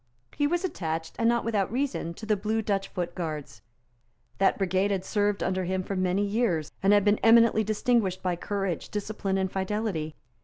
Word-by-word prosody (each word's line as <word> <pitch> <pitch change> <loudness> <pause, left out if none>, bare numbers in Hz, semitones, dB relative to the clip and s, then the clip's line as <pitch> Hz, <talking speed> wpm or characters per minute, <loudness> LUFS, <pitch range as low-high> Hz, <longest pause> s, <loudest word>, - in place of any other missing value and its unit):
He 290 0 +2
was 350 +4 0
attached, 160 - -4
and 230 0 +3
not 235 0 +1
without 210 -4 0
reason, 245 -10 -2
to 220 - -8
the 215 -1 +2
Blue 215 +2 -1
Dutch 195 -2 -1
Foot 175 -2 -4
Guards. 155 - -5 0.8
That 195 - +3
brigade 190 +1 +1
had 190 -2 -1
served 205 -1 0
under 185 0 -1
him 185 +1 -1
for 195 - -4
many 185 +2 +1
years, 200 -8 0
and 195 +1 +4
had 205 -1 +5
been 205 0 +3
eminently 230 -1 +5
distinguished 215 -3 0
by 180 -1 0
courage, 195 -1 -3
discipline 205 -2 -2
and 190 -1 -1
fidelity. 190 -5 -2
195 Hz, 185 wpm, -27 LUFS, 185-220 Hz, 0.8 s, had